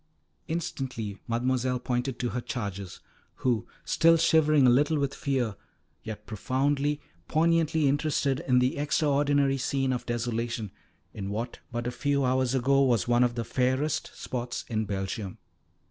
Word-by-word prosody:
Instantly 130 Hz, -, -4 dB
Mademoiselle 125 Hz, +2 st, 0 dB
pointed 125 Hz, 0 st, -2 dB
to 120 Hz, -, -1 dB
her 120 Hz, -, -3 dB
charges, 100 Hz, -7 st, -5 dB, 0.4 s
who, 115 Hz, -3 st, +1 dB, 0.2 s
still 165 Hz, 0 st, +5 dB
shivering 155 Hz, -3 st, +4 dB
a -, -, +7 dB
little 145 Hz, +5 st, +3 dB
with 140 Hz, -1 st, 0 dB
fear, 125 Hz, -7 st, -1 dB, 0.5 s
yet 105 Hz, -1 st, -7 dB
profoundly, 140 Hz, +7 st, 0 dB, 0.3 s
poignantly 160 Hz, -1 st, +2 dB
interested 140 Hz, -1 st, +1 dB
in 125 Hz, -1 st, +4 dB
the 125 Hz, +5 st, +2 dB
extraordinary 145 Hz, -2 st, +2 dB
scene 135 Hz, -1 st, 0 dB
of 125 Hz, -, -4 dB
desolation, 115 Hz, -3 st, -2 dB, 0.4 s
in 100 Hz, -2 st, -5 dB
what 115 Hz, +4 st, -4 dB
but 120 Hz, 0 st, -3 dB
a 120 Hz, -, -1 dB
few 140 Hz, +2 st, 0 dB
hours 130 Hz, 0 st, +1 dB
ago 135 Hz, +2 st, +3 dB
was 120 Hz, -3 st, +2 dB
one 120 Hz, 0 st, +4 dB
of 120 Hz, -1 st, +1 dB
the 115 Hz, -1 st, -2 dB
fairest 130 Hz, +5 st, 0 dB
spots 125 Hz, 0 st, -4 dB
in 110 Hz, -2 st, 0 dB
Belgium. 95 Hz, 0 st, -4 dB
130 Hz, 145 wpm, -28 LUFS, 120-140 Hz, 0.5 s, a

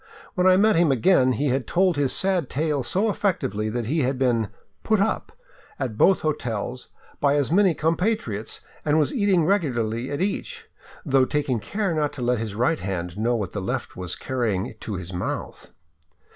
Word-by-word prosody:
When 180 Hz, -3 st, +2 dB
I 185 Hz, 0 st, +6 dB
met 215 Hz, +2 st, +4 dB
him 165 Hz, -3 st, +4 dB
again 130 Hz, 0 st, +4 dB
he 140 Hz, +5 st, 0 dB
had 125 Hz, -2 st, -1 dB
told 180 Hz, -1 st, +2 dB
his 145 Hz, -2 st, +1 dB
sad 185 Hz, -7 st, 0 dB
tale 150 Hz, 0 st, 0 dB
so 195 Hz, -, 0 dB
effectively 110 Hz, -, -1 dB
that 120 Hz, +1 st, -2 dB
he 150 Hz, +8 st, 0 dB
had 130 Hz, -1 st, 0 dB
been 120 Hz, -5 st, +1 dB, 0.2 s
" -, -, -43 dB
put 220 Hz, -2 st, +2 dB
up 200 Hz, +3 st, 0 dB, 0.2 s
*' -, -, -27 dB
at 130 Hz, -6 st, -3 dB
both 190 Hz, -, +4 dB
hotels 125 Hz, -5 st, -3 dB, 0.3 s
by 140 Hz, 0 st, +3 dB
as 145 Hz, 0 st, +1 dB
many 190 Hz, -2 st, +4 dB
compatriots 160 Hz, -, -1 dB, 0.2 s
and 150 Hz, 0 st, +2 dB
was 150 Hz, -, +2 dB
eating 200 Hz, -, +2 dB
regularly 125 Hz, -, 0 dB
at 145 Hz, -, -3 dB
each, 455 Hz, -, -3 dB, 0.4 s
though 135 Hz, -3 st, +4 dB
taking 140 Hz, -4 st, -1 dB
care 200 Hz, -, -2 dB
not 150 Hz, -2 st, 0 dB
to 125 Hz, -, -5 dB
let 120 Hz, -1 st, +1 dB
his 110 Hz, -3 st, -4 dB
right 125 Hz, +8 st, +1 dB
hand 90 Hz, -2 st, -4 dB
know 115 Hz, +4 st, +1 dB
what 100 Hz, -5 st, -3 dB
the 100 Hz, -, -3 dB
left 95 Hz, -, -3 dB
was 90 Hz, -1 st, -4 dB
carrying 115 Hz, -7 st, -2 dB
to 105 Hz, -, -5 dB
his 90 Hz, 0 st, -6 dB
mouth. 90 Hz, -, -5 dB
135 Hz, 190 wpm, -24 LUFS, 115-180 Hz, 0.4 s, I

